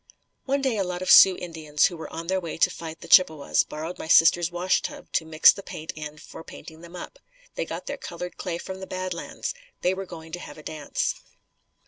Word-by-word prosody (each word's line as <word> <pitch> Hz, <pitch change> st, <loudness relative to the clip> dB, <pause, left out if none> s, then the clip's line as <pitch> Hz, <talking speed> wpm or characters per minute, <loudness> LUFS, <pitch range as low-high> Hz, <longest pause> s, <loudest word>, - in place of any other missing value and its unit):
One 275 Hz, 0 st, 0 dB
day 255 Hz, -5 st, +1 dB
a 195 Hz, -, +1 dB
lot 180 Hz, 0 st, -4 dB
of -, -, +2 dB
Sioux 190 Hz, -1 st, +9 dB
Indians 160 Hz, -4 st, 0 dB
who 175 Hz, -, 0 dB
were 160 Hz, -, -8 dB
on 165 Hz, +1 st, -6 dB
their 190 Hz, +2 st, 0 dB
way 165 Hz, -2 st, -6 dB
to -, -, +3 dB
fight 160 Hz, -1 st, -8 dB
the -, -, -10 dB
Chippewas 160 Hz, -6 st, +5 dB
borrowed 160 Hz, +4 st, -7 dB
my -, -, -6 dB
sister's 170 Hz, +1 st, +5 dB
washtub 175 Hz, +2 st, -1 dB
to 160 Hz, -, 0 dB
mix 160 Hz, 0 st, +7 dB
the 200 Hz, -, -9 dB
paint 155 Hz, -4 st, -7 dB
in 150 Hz, 0 st, -8 dB
for 160 Hz, -, -11 dB
painting 160 Hz, 0 st, -12 dB
them 170 Hz, +1 st, -12 dB
up. -, -, -9 dB, 0.3 s
They -, -, -3 dB
got -, -, -6 dB
their -, -, -4 dB
colored 180 Hz, +1 st, -7 dB
clay 175 Hz, -3 st, -4 dB
from 190 Hz, +2 st, -7 dB
the 190 Hz, -, -8 dB
Bad 185 Hz, 0 st, -3 dB
Lands. 170 Hz, -, -5 dB, 0.3 s
They 180 Hz, -, +2 dB
were 190 Hz, 0 st, -6 dB
going 160 Hz, -2 st, -10 dB
to 175 Hz, -, -5 dB
have -, -, -10 dB
a 155 Hz, -, -12 dB
dance. 150 Hz, -2 st, -2 dB
170 Hz, 225 wpm, -25 LUFS, 160-185 Hz, 0.3 s, Sioux